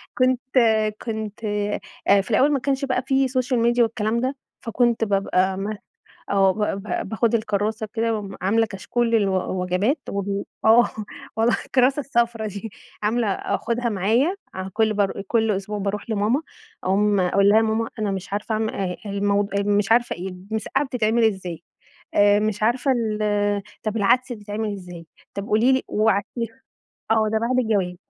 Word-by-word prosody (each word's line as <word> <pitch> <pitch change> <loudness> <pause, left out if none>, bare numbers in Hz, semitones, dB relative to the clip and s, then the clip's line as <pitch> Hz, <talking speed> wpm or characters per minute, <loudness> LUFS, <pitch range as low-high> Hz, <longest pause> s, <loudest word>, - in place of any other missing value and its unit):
كنت 255 -1 +2 0.6
كنت 220 -1 -5 0.6
آآ، 200 0 +6
في 195 - -7
الأول 275 +7 +4
ما 280 - +2
كانش 275 +1 -1
بقى 255 -1 0
في 270 -1 +2
سوشيال 255 -1 0
ميديا 235 +1 +3
والكلام 225 0 0
ده 260 +2 -1 0.3
فكنت 235 0 +1
بابقى 195 -2 +1
ما 205 +2 -4 0.5
آه، 195 -1 +4
با 210 -1 -1
با 195 -1 -3
باخد 225 +3 0
الكرّاسة 215 0 -1
كده 230 0 +1
وم 200 -2 -6
عاملة 225 +4 +2
كشكول 230 +4 -2
للو 190 -4 +1
وجبات 200 - 0
وال 200 0 -2 0.2
آه 230 +2 +6 0.5
والله 225 +2 +3
الكرّاسة 265 +2 +3
الصفرا 235 -5 0
دي 205 +2 -6 0.3
عاملة 225 +2 +1
أخدها 235 +4 -1
معايا 225 - +1 0.2
أع 190 0 -4
كل 220 0 +2
بار 200 -1 0
آآ، 195 - -5
كل 225 -2 +2
أسبوع 205 +1 -2
باروح 200 +2 -3
لماما 220 +7 +1 0.4
عمومًا 195 0 +2
أقول 200 +2 +3
لها 210 - +5
يا 225 - +6
ماما 225 +1 0
أنا 210 -2 -1
مش 195 0 -5
عارفة 210 +2 -2
اعم 220 0 0
آآ، 185 -4 -3
الموض 200 0 0
آآ، 200 - +1
مش 205 +1 +2
عارفة 240 +1 +2
إيه 180 +2 -5
المسقعة 200 +8 -3
بتتعمل 235 -3 +1
ازاي 185 -6 -1 0.5
آآ، 205 0 +5
مش 215 -1 -1
عارفة 245 +5 +2
ال 225 -4 -1 0.6
طب 215 0 -2
العدس 245 +5 +2
بيتعمل 210 -1 -4
ازاي، 180 -3 -9 0.3
طب 200 0 -4
قولي 225 +5 +3
لي 260 - +2
وابعتيها 220 +3 -1 0.5
آه، 220 -1 +3
ده 220 - +1
بعد 250 +2 +1
الجواز، 200 -6 0
215 Hz, 165 wpm, -23 LUFS, 200-235 Hz, 0.6 s, آآ